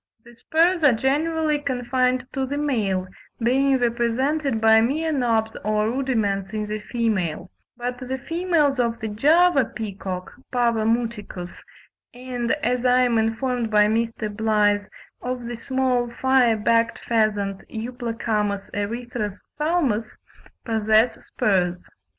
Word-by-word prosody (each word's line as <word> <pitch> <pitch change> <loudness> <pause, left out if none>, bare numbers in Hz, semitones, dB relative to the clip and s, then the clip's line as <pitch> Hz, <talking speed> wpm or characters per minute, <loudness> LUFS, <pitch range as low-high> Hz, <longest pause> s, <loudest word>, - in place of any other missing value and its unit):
The 240 - -15
spurs 335 +8 +2
are 285 -4 +6
generally 300 +5 +1
confined 255 -2 0
to 265 -1 -1
the 285 +2 -3
male, 215 -11 0 0.3
being 265 +3 +3
represented 245 +3 0
by 220 0 +6
mere 310 +7 0
knobs 230 -5 0
or 215 +1 +1
rudiments 220 -7 -1
in 215 -1 -2
the 215 0 -4
female; 210 -7 -2 0.3
but 245 +1 -4
the 260 0 -4
females 315 -2 0
of 235 -1 0
the 220 - -4
Java 300 +7 +4
peacock 195 -5 -6 0.2
(Pavo 235 -3 +1
muticus) 225 -6 -2 0.6
and, 245 -1 -4
as 250 0 0
I 250 0 +4
am 240 -2 +3
informed 225 +1 -1
by 210 -1 +5
Mr. 225 +1 0
Blyth, 210 -2 +2 0.3
of 250 -1 -4
the 240 0 -4
small 250 0 0
fire 250 -2 +3
backed 230 +2 +2
pheasant 205 -4 0
(Euplocamus 225 -3 -3
erythrophthalmus) 235 - -2 0.5
possess 220 0 +2
spurs. 180 -3 0
235 Hz, 120 wpm, -23 LUFS, 215-260 Hz, 0.6 s, are